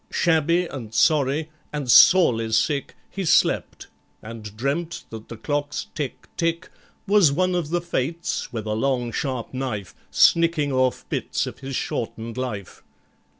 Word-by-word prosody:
Shabby 170 +1 +2
and 125 -9 -8
sorry 155 0 +2 0.2
and 145 -3 -4
sorely 115 -13 +6
sick, 140 +3 0
He 195 - -5
slept, 165 - +2 0.4
and 110 -2 -9
dreamt 160 +7 -2
that 110 -1 -9
the 115 - -8
clock's 145 +5 -3
"tick, 145 -4 -5
tick," 165 +2 -1 0.3
Was 200 -7 +5
one 185 +5 +1
of 175 -4 -1
the 175 +1 0
Fates, 170 0 -3
with 110 -3 -5
a 105 - -1
long 125 +1 0
sharp 130 -2 -3
knife, 125 -8 -4 0.2
Snicking 165 -4 +3
off 130 -1 0
bits - - -1
of - - -8
his 135 0 -6
shortened 115 -1 -4
life. 115 -7 -5
140 Hz, 145 wpm, -23 LUFS, 115-165 Hz, 0.4 s, sorely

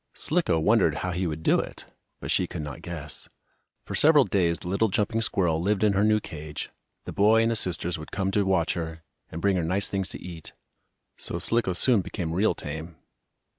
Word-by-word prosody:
Slicko 160 - +1
wondered 95 -3 +3
how 90 - -1
he 90 +1 -1
would 80 0 -5
do - - +4
it, - - -6 0.4
but - - -3
she - - +2
could - - -5
not 75 -2 -7
guess. 80 -4 -5 0.6
For - - -6
several 150 -2 +6
days 85 -7 +1
the 80 - -10
little 100 +5 +2
jumping 110 +3 0
squirrel 90 -7 +1
lived 100 +3 +1
in 105 -2 +4
her 100 +1 +2
new 105 0 +4
cage. 75 -6 -7 0.3
The - - -6
boy 110 +3 +4
and 115 - +2
his 115 - +1
sisters 90 -1 -2
would 80 - -10
come 95 0 -1
to 100 +1 +2
watch 95 -4 +1
her, 80 -1 -5 0.3
and 80 - -6
bring 100 -2 +3
her 85 - 0
nice 95 +5 0
things 95 -2 -2
to - - -8
eat, 85 -3 -8 0.6
so - - -2
Slicko 95 +2 +1
soon 110 +4 +4
became 85 -3 -4
real 100 +5 +2
tame. 80 +1 -7
95 Hz, 210 wpm, -26 LUFS, 80-105 Hz, 0.6 s, several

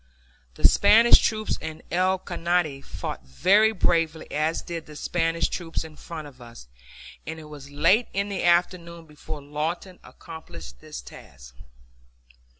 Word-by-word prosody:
The - - +6
Spanish 220 +4 +7
troops 215 -1 -1
in 160 0 -7
El 185 +2 +2
Caney 175 -5 -1
fought 85 - -6
very 195 - +4
bravely, 165 -5 +1
as 155 +2 0
did 165 -2 -6
the 150 - -11
Spanish 165 +1 0
troops 165 -2 -4
in 160 -1 -11
front 155 -1 -8
of 130 -3 -16
us, 115 - -12 0.6
and 160 0 -5
it - - -10
was 150 -2 -11
late 185 +11 +3
in 200 +1 -1
the 200 -1 -3
afternoon 170 -1 +1
before 150 -1 -9
Lawton 165 +5 -4
accomplished 85 - -11
his - - -8
task. - - -13
165 Hz, 145 wpm, -25 LUFS, 150-180 Hz, 0.6 s, Spanish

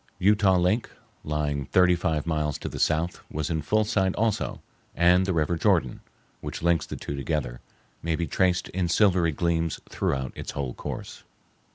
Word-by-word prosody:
Utah 100 -1 +4
Lake, 90 +7 +1 0.3
lying 75 -2 -1
thirty 90 -1 +4
five 80 -3 -1
miles 75 -3 -1
to - - -6
the - - -6
south, 85 +3 0
was 75 +1 -3
in 80 -1 0
full 110 +8 +2
sight 95 -4 +1
also, 110 -1 -1 0.4
and 90 +2 +4
the - - +1
river 80 +1 +1
Jordan, - - +2 0.4
which - - -6
links 85 -3 +2
the - - -5
two 70 - -5
together, 70 -4 -3 0.4
may 80 0 0
be 85 - -1
traced 90 +3 +1
in 90 -1 -1
silvery 90 -2 +3
gleams 85 +1 -1
throughout 65 -2 -1
its - - -6
whole 65 -3 -3
course. - - -7
85 Hz, 170 wpm, -26 LUFS, 75-90 Hz, 0.4 s, Utah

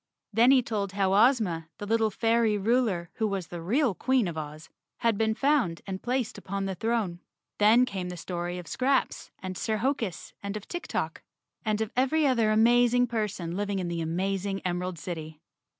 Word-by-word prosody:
Then 230 +4 +5
he 265 -2 +6
told 205 -4 -2
how 195 -1 +1
Ozma, 200 -8 +3
the 205 - -6
little 220 +1 +2
fairy 225 0 +2
ruler, 205 -5 +1
who 220 -2 +1
was 195 -4 -3
the 175 -1 -6
real 240 - +2
Queen 255 +3 +1
of 170 - -4
Oz, 155 0 -7 0.3
had 230 -2 +3
been 220 +1 +1
found 270 - +1
and 190 -1 -5
placed 245 -3 -2
upon 195 0 -3
the 195 - -2
throne. 210 -3 -1 0.4
Then 220 +4 +6
came 190 -6 -4
the 180 - -6
story 175 +1 -4
of 180 - -7
Scraps 265 - 0
and 185 0 -4
Sir 220 +3 -1
Hokus 225 - -2
and 200 +1 -4
of 210 - -10
Tik 350 0 -5
Tok, - - -3 0.4
and 215 -1 0
of 220 - -2
every 270 +5 +2
other 235 -5 +3
amazing 240 +3 +4
person 210 -7 -3
living 200 0 -1
in 180 -2 -2
the 170 -1 -2
amazing 195 +4 -1
Em¬ 180 -1 -1
erald 180 -1 -4
City. 160 -2 -6
205 Hz, 190 wpm, -28 LUFS, 180-235 Hz, 0.4 s, he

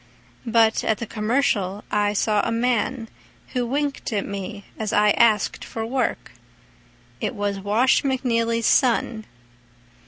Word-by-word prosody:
But 225 -1 +3
at 220 - +1
the 235 - -5
"Commercial" 210 -3 0
I 205 0 +1
saw 210 0 +1
a - - -2
man 235 0 0 0.4
Who 250 -2 -2
winked 285 +1 -2
at 205 -3 -1
me 200 0 -6
as 215 -2 -3
I 210 0 +4
asked 215 -2 +2
for 225 -1 -5
work— 255 +3 -2 0.9
It - - -3
was 205 -1 -2
Wash 215 +6 +2
McNeely's 230 -4 0
son. 230 -3 +2
225 Hz, 130 wpm, -23 LUFS, 210-240 Hz, 0.9 s, I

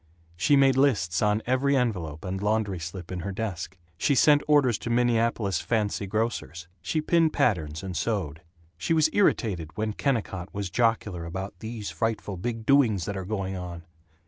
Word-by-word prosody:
She 100 +11 +3
made 135 -1 +4
lists 105 - +2
on 105 +1 +2
every 135 +3 +2
envelope 90 - -2
and 95 +1 -3
laundry 105 -3 0
slip 85 +2 -7
in 90 - -3
her 100 +3 -4
desk. 95 -3 -4 0.2
She 140 - +2
sent 145 +3 +5
orders 140 -7 +4
to - - -5
Minneapolis 115 -5 +1
"fancy 105 0 -1
grocers." 105 -5 -3
She 155 - -1
pinned 165 0 +2
patterns 80 -8 0
and 95 -2 -5
sewed. 85 -5 -2 0.4
She 130 - 0
was 155 0 +3
irritated 90 - +1
when 110 0 -1
Kennicott 105 -9 -2
was 100 -2 -3
jocular 105 -4 0
about 95 +4 -5
"these 110 -2 -5
frightful 110 -3 -2
big 115 +4 -4
doings 115 -10 +3
that 100 - -4
are 95 -1 -4
going 95 -2 -3
on." 90 -2 -6
105 Hz, 170 wpm, -26 LUFS, 90-120 Hz, 0.4 s, sent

